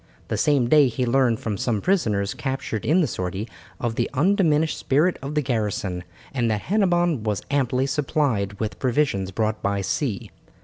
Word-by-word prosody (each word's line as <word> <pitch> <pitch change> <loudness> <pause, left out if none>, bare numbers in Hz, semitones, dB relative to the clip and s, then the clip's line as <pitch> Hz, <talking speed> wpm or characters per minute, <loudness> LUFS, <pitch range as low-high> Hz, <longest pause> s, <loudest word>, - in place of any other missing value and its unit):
The - - 0
same 140 -5 +2
day, 145 +1 +6
he 125 +1 -1
learned 120 -2 +2
from 105 -4 -3
some 115 -4 0
prisoners 105 - +1
captured 130 -5 -3
in 170 +5 +4
the - - +3
sortie, 95 +4 -4 0.3
of 120 -2 -1
the 120 0 -1
undiminished 160 -1 +2
spirit 155 +7 +1
of 140 +3 -5
the 150 - +2
garrison, 105 -7 -2 0.3
and 120 -4 +1
that 105 -2 0
Hennebon 175 - +1
was 105 -2 -2
amply 130 -2 +1
supplied 135 - 0
with 110 -1 -3
provisions 125 -7 +1
brought 110 +2 -1
by 100 0 0
sea. 105 - -2
125 Hz, 170 wpm, -23 LUFS, 105-150 Hz, 0.3 s, day